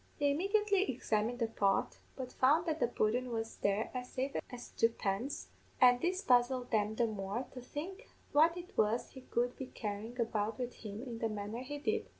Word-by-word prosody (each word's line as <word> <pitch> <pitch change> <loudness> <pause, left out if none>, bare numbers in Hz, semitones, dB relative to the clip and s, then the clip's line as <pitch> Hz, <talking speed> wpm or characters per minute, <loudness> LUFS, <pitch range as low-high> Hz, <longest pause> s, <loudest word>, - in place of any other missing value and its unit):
"They 285 -1 +3
immediately 395 +4 +2
examined 230 -1 0
the 235 - +1
pot, 200 -3 +1 0.2
but 255 -2 -6
found 300 +6 +4
that 320 -2 -1
the - - +3
pudden 245 +2 +1
was 225 -1 -3
there 200 +2 0
as 250 -1 -4
safe 265 +2 -2
as 245 -2 -8
tuppence, 230 +2 0 0.3
an' 245 -1 +7
this 370 +3 0
puzzled 250 0 +3
them 215 -1 +2
the 235 - +3
more, 210 +3 -3
to 255 - -7
think 370 - -7 0.2
what 320 +4 +5
it 355 +3 -9
was 220 +3 +1
he 260 - -10
could 245 0 -1
be 265 - -5
carryin' 220 +3 -5
about 220 -2 0
wid 250 -1 -3
him 215 +1 -7
in 235 -3 -6
the 225 - 0
manner 210 +2 -4
he 290 +3 -5
did. 435 +9 -1
245 Hz, 190 wpm, -34 LUFS, 220-285 Hz, 0.3 s, an